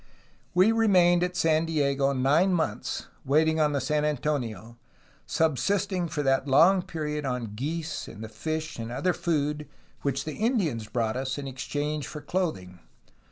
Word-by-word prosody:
We 185 +5 +6
re 225 0 +2
mained 175 -3 +5
at 180 0 -1
San 160 0 +2
Diego 140 -3 +1
nine 145 +8 +3
months 120 -11 -2 0.2
waiting 160 +3 +3
for 155 -1 +3
the 145 -1 0
San 150 +3 0
Antonio, 120 -7 -2 0.5
subsisting 180 - +1
for 150 -2 -2
that 135 0 +2
long 170 +8 +5
period 155 -4 -4
on 125 -5 -3
geese 150 +6 -4
and 110 - -9
the - - -5
fish 155 +4 -4
and 115 +1 -5
other 145 +9 0
food 150 -4 -1 0.3
which 140 -1 -1
the 155 - -4
Indians 185 - 0
brought 115 -2 -1
us 130 +1 -2
in 140 -1 -5
exchange 145 +2 -3
for 150 - -7
clothing. 145 - -3
150 Hz, 160 wpm, -27 LUFS, 135-165 Hz, 0.5 s, We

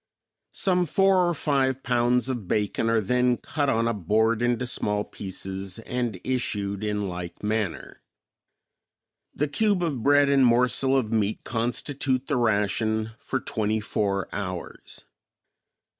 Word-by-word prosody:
Some 180 -2 +1
four 185 +2 +3
or 175 - -1
five 135 -3 0
pounds 120 0 +2
of 120 -8 -4
bacon 105 +3 0
are 115 -1 +3
then 125 +3 +2
cut 145 -2 -2
on 115 -1 +1
a 115 - +1
board 110 +4 +1
into 120 0 +1
small 105 -3 -1
pieces 95 -1 -6
and 115 -3 -3
issued 105 -6 -2
in 105 -1 -1
like 90 0 -7
manner. 105 -3 -3 1.3
The 150 - 0
cube 200 +5 +1
of 145 -8 -2
bread 145 +2 +5
and 140 -1 +4
morsel 125 +2 +3
of 115 -4 -1
meat 110 -1 0
constitute 130 +3 -1
the 140 -2 0
ration 110 0 +1
for 130 - -2
twenty 110 -3 -1
four 100 -2 -1
hours. 90 -4 -6
115 Hz, 135 wpm, -25 LUFS, 105-130 Hz, 1.3 s, bread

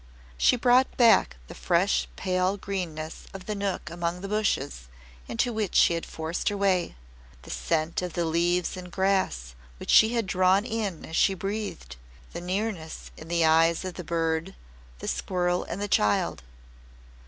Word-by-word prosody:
She - - +4
brought 250 +2 +3
back 235 - +5
the - - -9
fresh - - +1
pale 185 +1 0
greenness 170 -6 -5
of 190 -1 -8
the 215 - -2
nook 200 -6 -3
among 170 +1 -3
the 195 - -5
bushes 195 - -1 0.4
into 235 +1 -1
which 215 -4 -2
she - - +6
had 165 - -3
forced 160 +5 -2
her 205 - -3
way, 190 - +1 0.5
the - - -9
scent 155 - -1
of 180 -2 -4
the 170 - 0
leaves 170 +3 +1
and 180 -1 -9
grass 190 - 0 0.2
which - - -3
she 220 +2 +6
had 230 -2 +1
drawn 185 +2 +3
in 215 -8 -3
as 160 - -7
she 195 - +3
breathed, 195 - -5 0.4
the - - -5
nearness 185 -3 -4
in 155 - -11
the 170 -1 +2
eyes 165 +2 +3
of 185 - -4
the 180 - -7
bird, 165 +2 -1 0.4
the - - -7
squirrel, 180 -1 -1
and 175 - -5
the 205 - -2
child. 105 - +1
180 Hz, 165 wpm, -27 LUFS, 165-200 Hz, 0.5 s, she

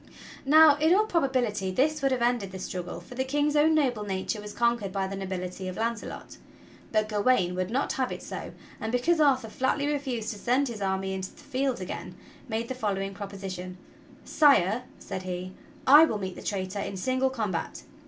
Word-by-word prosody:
Now 305 0 +8
in 320 +4 +4
all 425 +2 +4
probability 255 - 0
this 300 +10 +1
would 275 -1 +2
have 250 -2 +1
ended 240 -5 +1
the 190 - -7
struggle, 180 -1 -5
for - - -12
the 260 +1 -1
King's 290 +2 0
own 310 +2 +5
noble 255 -8 +1
nature 195 +2 -3
was 210 0 -8
conquered 235 -3 0
by 195 0 -1
the 195 +1 -4
nobility 185 -1 -5
of 185 - -5
Launce 230 -1 -1
lot, - - -9 0.5
but 215 0 +2
Gawain 205 -3 +2
would 185 0 -2
not 260 +5 0
have 260 -1 -1
it - - -6
so, - - -6 0.3
and, 220 - -3
because 310 +8 +2
Arthur 265 -6 +3
flatly 265 +5 0
refused 270 -6 -2
to 205 - -10
send 260 +4 +1
his 220 -3 -7
army 190 0 -1
into 190 0 -4
the - - -16
field 260 -2 -1
again, 185 - -6 0.3
made 225 +1 -2
the 260 - -3
following 195 -5 -2
proposition: 190 -2 -7 0.5
"Sire," 250 - +4
said 185 - -6
he, 185 0 -5 0.3
"I 295 +4 +9
will 225 - -2
meet 190 -2 -4
the - - -9
traitor 195 0 -3
in 200 -1 -4
single 260 +6 +1
combat. 215 -9 -3
225 Hz, 195 wpm, -27 LUFS, 190-265 Hz, 0.5 s, I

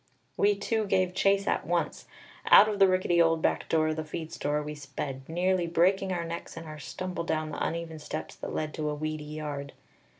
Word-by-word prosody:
We 205 0 +3
two 215 +1 -1
gave 185 -2 +2
chase 195 +1 +3
at - - 0
once; - - -1 0.4
out 210 - +9
of 210 -2 -2
the 195 - +8
rickety 185 -2 +3
old 165 -1 +3
back - - 0
door 155 -1 +3
of 155 - -2
the 155 - -2
feed 160 +1 -6
store 150 +1 -1
we 150 0 -5
sped, 140 -2 -6
nearly 180 +1 +1
breaking 190 +3 +2
our 175 -2 -1
necks 165 0 -6
in 165 - -6
our 155 -1 -9
stumble 180 +3 -4
down 155 -1 -1
the - - -3
uneven 165 -1 -3
steps 155 +1 -5
that - - -6
led 155 -1 -3
to 155 -1 -2
a 150 - -2
weedy 155 0 -4
yard. 150 -2 -5
165 Hz, 210 wpm, -29 LUFS, 155-185 Hz, 0.4 s, out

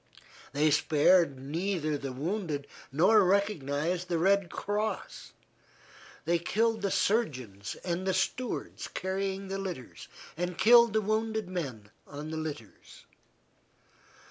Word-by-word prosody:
They 150 +3 +2
spared 155 0 +4
neither 155 +2 -2
the 140 -2 -4
wounded 155 +1 -3 0.3
nor 190 +9 +5
recognized 180 -3 0
the 170 - +1
Red 195 +2 +3
Cross; 210 +1 -3 0.9
they 170 +1 +2
killed 220 +5 +1
the 200 - 0
surgeons 130 - -1
and 180 +1 -2
the 190 - +2
stewards 240 +6 -2
carrying 195 +1 -3
the 195 +1 -3
litters, 180 -11 -7 0.3
and 175 +1 -3
killed 235 +1 +7
the 220 - +2
wounded 220 0 -1
men 130 - -5 0.2
on 150 +2 -7
the 160 - -3
litters. 150 -9 -8
180 Hz, 115 wpm, -30 LUFS, 150-200 Hz, 0.9 s, killed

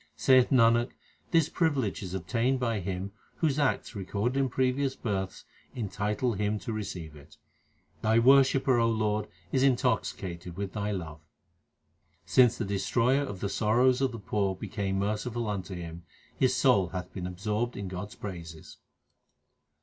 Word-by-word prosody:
Saith 125 - +5
Nanak, 120 -2 +4 0.4
this 165 -3 +3
privilege 135 - 0
is 95 -1 -5
obtained 115 +9 0
by 115 -4 0
him 95 +1 -4 0.2
whose 150 -3 0
acts 140 -4 0
recorded 100 +5 -2
in 135 -1 +1
previous 130 +2 0
births 95 -4 -3 0.3
entitle 105 +1 -1
him 105 +1 -1
to 115 +2 -5
receive 90 -7 -5
it. 75 0 -16 0.6
Thy 110 +1 +3
worshipper, 135 0 +5
O 115 0 +3
Lord, 105 -1 0 0.2
is 130 - +2
intoxicated 100 -9 0
with 100 -1 -4
Thy 105 -1 -2
love. 80 -6 -5 1.0
Since 125 -2 +4
the 115 - -2
Destroyer 115 +7 +1
of 100 -10 -5
the 100 - 0
sorrows 125 +5 +3
of 135 -2 +2
the 115 - -6
poor 100 -2 -1
became 95 0 -3
merciful 110 +4 -2
unto 95 -2 -4
him, 85 -1 -7 0.3
his - - +2
soul 95 -2 +4
hath 90 0 -6
been 90 -1 -4
absorbed 105 +6 -2
in 100 -1 -4
God 90 +2 -5
s - - -14
praises. 85 -5 -8
105 Hz, 150 wpm, -29 LUFS, 95-125 Hz, 1.0 s, Saith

